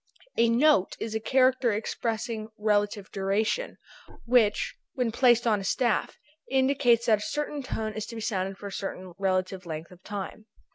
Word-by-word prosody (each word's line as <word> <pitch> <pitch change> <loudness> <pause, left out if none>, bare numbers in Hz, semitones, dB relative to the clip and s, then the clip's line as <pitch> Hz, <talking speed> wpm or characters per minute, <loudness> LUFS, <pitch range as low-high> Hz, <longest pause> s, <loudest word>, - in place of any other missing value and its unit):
A 230 0 +4
note 235 -4 +3
is 220 -1 -4
a 220 - 0
character 255 +1 +3
expressing 220 +1 -3
relative 205 -1 0
duration, 210 - -1 0.5
which 235 -3 +3 0.2
when 250 -4 0
placed 240 0 +4
on 215 -3 +3
a - - -6
staff 235 +3 0 0.3
indicates 260 -3 +3
that 220 -3 +4
a - - -9
certain 295 +4 -3
tone 220 -4 -3
is 215 -1 -5
to 235 - -8
be 225 - -5
sounded 195 -3 -2
for 205 - -10
a 200 - -5
certain 185 -2 -5
relative 185 -1 -1
length 160 +1 -6
of 180 0 -15
time. 205 +2 -6
220 Hz, 170 wpm, -27 LUFS, 195-240 Hz, 0.5 s, A